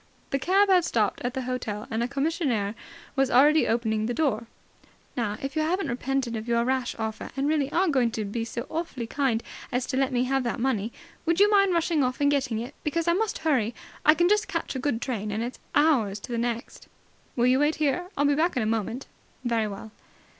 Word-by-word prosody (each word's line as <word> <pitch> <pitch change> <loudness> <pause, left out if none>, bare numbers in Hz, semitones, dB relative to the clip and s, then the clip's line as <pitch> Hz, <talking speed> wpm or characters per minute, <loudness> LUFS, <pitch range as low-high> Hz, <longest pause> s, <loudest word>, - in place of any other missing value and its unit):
The 275 - +1
cab 385 +8 +4
had 370 -2 +5
stopped 215 -9 0
at 245 0 -3
the 260 - -2
hotel, 240 -4 -3
and 225 +1 -1
a 240 - +1
commissionaire 275 - 0 0.4
was 270 -1 +2
already 295 +5 +5
opening 220 -2 0
the 240 - -2
door. 255 -8 0 0.7
"Now, 215 -4 -1
if 275 +3 -4
you 315 - +2
haven't 360 +5 0
repented 255 0 -1
of 220 +1 -5
your 235 0 +2
rash 260 -1 0
offer 220 -1 -4
and 275 +1 +1
really 295 -2 +1
are 370 +4 +2
going 260 -7 +3
to 215 - -2
be 225 +3 -3
so 235 +2 -5
awfully 315 -7 -4
kind 235 -2 0 0.3
as 250 0 0
to 260 - -2
let 270 -1 +2
me 245 -1 +1
have 270 +1 +1
that 235 -1 -2
money, 230 -4 0 0.3
would 335 +1 +1
you 410 +1 +6
mind 395 -3 +4
rushing 330 -3 +2
off 255 0 -1
and 285 0 +3
getting 270 -5 0
it, 235 +4 -5
because 330 +2 -1
I 340 - +5
must 430 +4 0
hurry. 245 -7 +2 0.3
I 305 - +6
can 345 +2 +3
just 420 +2 +2
catch - - -3
a - - -2
good 250 -3 -1
train, 215 -5 -3
and 215 +2 -2
it's 245 +2 -6 0.2
hours 255 -10 +3
to - - -8
the 235 - -1
next." 235 0 -4 0.5
"Will 240 - +2
you 255 +1 +4
wait 295 +2 +2
here? 310 +4 0
I'll 290 - +3
be 285 - +4
back 320 +1 +1
in 245 - +2
a - - -1
moment." 225 +3 -2 0.4
"Very 230 -2 +1
well." 210 +2 -8
255 Hz, 225 wpm, -26 LUFS, 230-305 Hz, 0.7 s, you